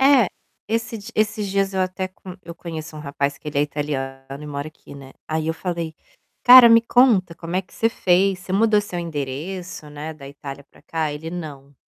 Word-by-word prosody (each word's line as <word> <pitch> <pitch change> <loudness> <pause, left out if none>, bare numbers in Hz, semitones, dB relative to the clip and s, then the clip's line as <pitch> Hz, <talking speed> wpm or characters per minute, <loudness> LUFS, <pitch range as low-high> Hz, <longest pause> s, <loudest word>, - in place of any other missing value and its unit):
É, 265 -6 +6 0.4
esses 225 -1 -2
di - - -8
esses 210 -1 +1
dias 195 0 0
eu 190 - +1
até 185 0 -1
com 185 -1 -11
eu 170 0 -8
conheço 160 -2 -7
um - - -7
rapaz 140 -1 -2
que 150 - -8
ele 145 - -2
é - - +4
italiano 135 -2 -4
e - - -7
mora 145 +1 -4
aqui, 150 -2 -15
né. 135 -1 -11
Aí, 160 0 -1
eu 160 - 0
falei: 170 -2 -3 0.5
"Cara, 250 -1 +11
me 230 0 +8
conta 230 -8 +4
como 170 +2 -5
é 190 - +1
que - - -22
você 225 - +2
fez, 190 -2 +2
você 185 - -7
mudou 215 +1 +4
seu 195 -4 -5
endereço, 155 +2 -5
né, 150 +2 -6
da 140 -2 -11
Itália 140 0 -9
para - - -20
cá?" 160 -2 -2
Ele: 155 +2 -6
"Não". 145 -5 -8
170 Hz, 210 wpm, -22 LUFS, 145-195 Hz, 0.5 s, Cara